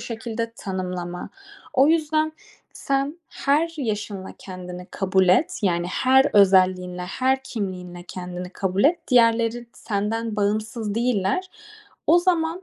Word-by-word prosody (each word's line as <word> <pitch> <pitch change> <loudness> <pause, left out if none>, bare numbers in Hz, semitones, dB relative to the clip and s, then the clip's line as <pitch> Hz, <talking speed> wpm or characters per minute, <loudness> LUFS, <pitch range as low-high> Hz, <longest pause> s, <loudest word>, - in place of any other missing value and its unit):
şekilde 230 0 -4
tanımlama. 180 -2 -5 0.4
O 270 +2 +5
yüzden 315 -1 +2 0.4
sen 275 +4 -2
her 315 +4 0
yaşınla 210 -7 -4
kendini 180 -1 -8
kabul 190 -1 +1
et. 190 - +3
Yani 175 -2 +1
her 265 +8 +4
özelliğinle, 185 -2 +4
her 260 +8 0
kimliğinle 180 -7 -5
kendini 180 0 -6
kabul 190 +2 -1
et. 340 +4 +4
Diğerleri 235 -1 +3
senden 215 +1 -2
bağımsız 215 +1 -1
değiller. 235 - 0 0.6
O 345 - +7
zaman 345 0 0
215 Hz, 115 wpm, -23 LUFS, 185-265 Hz, 0.6 s, O